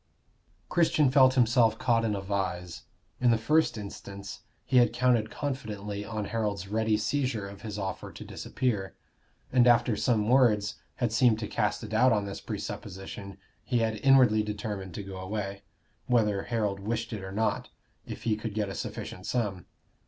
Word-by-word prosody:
Christian 155 -5 +3
felt 130 -1 +6
himself 120 -2 +4
caught 115 -2 +2
in 110 -2 0
a 100 - -3
vise. 95 -3 -3 0.3
In 125 - +4
the 115 - +4
first 150 +3 +2
instance 100 -1 -8 0.3
he 130 - +2
had 120 -2 +5
counted 120 -3 +2
confidently 105 -8 -4
on 105 0 -4
Harold's 105 -4 -2
ready 110 +1 +1
seizure 110 -2 -1
of 100 0 -11
his 105 -3 -6
offer 95 -2 -4
to - - -10
disappear, 105 -8 -2 0.6
and 125 -1 +5
after 120 -1 +4
some 110 0 +1
words 110 -5 +3 0.2
had 120 -3 -1
seemed 115 -1 +4
to 110 -1 -4
cast 105 +1 -1
a - - -5
doubt 115 +4 +4
on 105 -2 0
this 100 0 -6
presupposition 95 +1 -6 0.3
he 125 - 0
had 110 -1 +1
inwardly 130 -4 +5
determined 105 -3 -5
to 100 - -5
go 95 -1 -8
away, 100 +1 -4 0.5
whether 105 -5 +2
Harold 105 -4 -1
wished 115 +3 -3
it 105 -3 -5
or 95 - -6
not, 110 +2 -1 0.4
if - - -7
he 110 -2 +1
could 110 -1 -5
get 105 -2 -1
a - - -5
sufficient 105 -5 -6
sum. 100 -8 -2
110 Hz, 170 wpm, -29 LUFS, 100-120 Hz, 0.6 s, felt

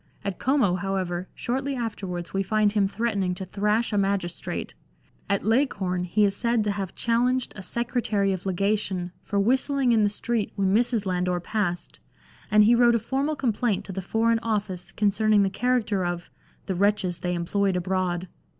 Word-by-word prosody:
At 200 -3 -3
Como, 250 -9 +2
however, 185 -1 -2
shortly 270 +3 -2
afterwards 195 -7 -4
we 195 - +1
find 210 +2 +2
him 205 -2 +3
threatening 200 -3 -1
to 190 - -6
thrash 210 +4 0
a 205 - +2
magistrate. 195 -3 -2 0.6
At 200 -1 +1
Leghorn 200 -7 +1
he 205 +4 +3
is 200 -1 +1
said 235 0 +1
to 210 - 0
have 195 -3 -4
challenged 245 +2 +1
a 190 - -7
secretary 215 -2 0
of 185 +1 -5
legation 190 -1 0
for 200 - -2
whistling 260 +4 +2
in 225 -2 +4
the 205 - +3
street 225 +1 -2
when 195 -1 +1
Mrs. 230 -1 +2
Landor 180 -1 0
passed, 175 -2 -3 0.5
and 210 0 +6
he 225 +3 +5
wrote 240 0 +5
a - - +2
formal 275 +7 -1
complaint 240 -5 0
to - - -7
the 190 +1 -4
Foreign 225 +4 +1
Office 205 -5 -3
concerning 210 0 +3
the 195 - 0
character 220 -4 0
of 175 0 -4 0.2
" - - -34
the 190 - -2
wretches 195 -2 +1
they 180 0 -2
employed 190 +3 0
abroad." 180 0 -1
205 Hz, 175 wpm, -25 LUFS, 185-230 Hz, 0.6 s, and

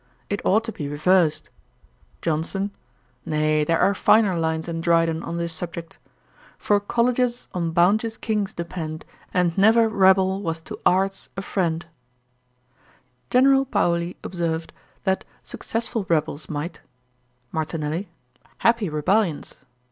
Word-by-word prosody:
It 205 - -2
ought 215 +4 +3
to 225 - -4
be 150 -9 -5
reversed.' 160 +2 +2 0.7
JOHNSON. 170 +5 -1 0.5
'Nay, 155 0 +1
there 165 +2 +2
are 200 - +3
finer 205 -1 +4
lines 160 0 -1
in 165 -1 -3
Dryden 165 -1 +2
on 170 0 -5
this 170 -1 -2
subject: 170 0 -6 0.6
"For 205 -1 +2
colleges 240 +3 0
on 170 -2 -1
bounteous 210 +7 +2
Kings 210 -3 -1
depend, 165 -2 -6 0.3
And 175 -2 +1
never 225 +3 +6
rebel 190 -2 +3
was 165 -4 -2
to - - -8
arts 195 +2 +1
a 195 - -3
friend."' 170 -4 -1 1.4
General 270 +1 +5
Paoli 170 -9 0
observed, 165 -2 -3 0.3
that 190 0 0 0.2
'successful 225 -3 -3
rebels 155 -2 0
might.' 155 +3 -5 0.7
MARTINELLI. 160 +3 -3 0.5
'Happy 230 -5 +2
rebellions.' 155 -2 -1
175 Hz, 120 wpm, -23 LUFS, 165-205 Hz, 1.4 s, never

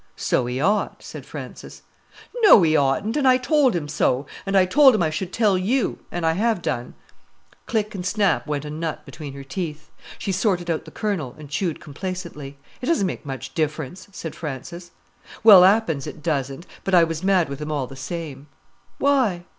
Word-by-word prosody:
"So 120 - 0
he 125 +1 -3
ought," 200 +8 0
said - - -9
Frances. - - -9 0.5
"No, 420 - +7
he 160 -1 +3
oughtn't! 145 - +1
and 275 -3 +2
I 255 0 +6
told 265 - +2
him 155 -4 -2
so. 145 -2 0 0.2
And 195 0 +2
I 185 - +5
told 265 +5 +6
him 205 - +1
I 155 - 0
should 180 +3 -4
tell 205 -4 +2
you—an' 195 -4 -2
I 160 - +3
have 215 0 0
done." 120 +1 -3 0.7
Click 215 -1 -1
and 190 -3 -5
snap 195 0 +1
went 150 -1 -2
a 150 - -6
nut 160 0 -4
between 145 -4 -8
her 140 - -8
teeth. 150 +2 -6 0.3
She 195 - -3
sorted 185 -3 0
out 160 - -3
the - - -10
kernel, 185 - -3
and 150 -2 -12
chewed 165 +1 -2
complacently. 155 -3 -7 0.2
"It 250 - -4
doesn't 325 -12 +2
make 170 - -5
much 135 -3 -6
difference," 155 +3 -3
said 165 -5 -7
Frances. 170 +4 -7 0.5
"Well, 200 -5 +10
'appen 190 -6 +3
it 155 - -9
doesn't; 140 0 -2 0.2
but 195 - +1
I 175 - +7
was 165 +1 -2
mad 190 -3 +3
with 140 +1 -7
him 150 +1 -4
all 145 -3 -1
the 135 - -11
same." 145 0 -6 0.5
"Why?" 255 -11 +2
170 Hz, 190 wpm, -23 LUFS, 150-200 Hz, 0.7 s, Well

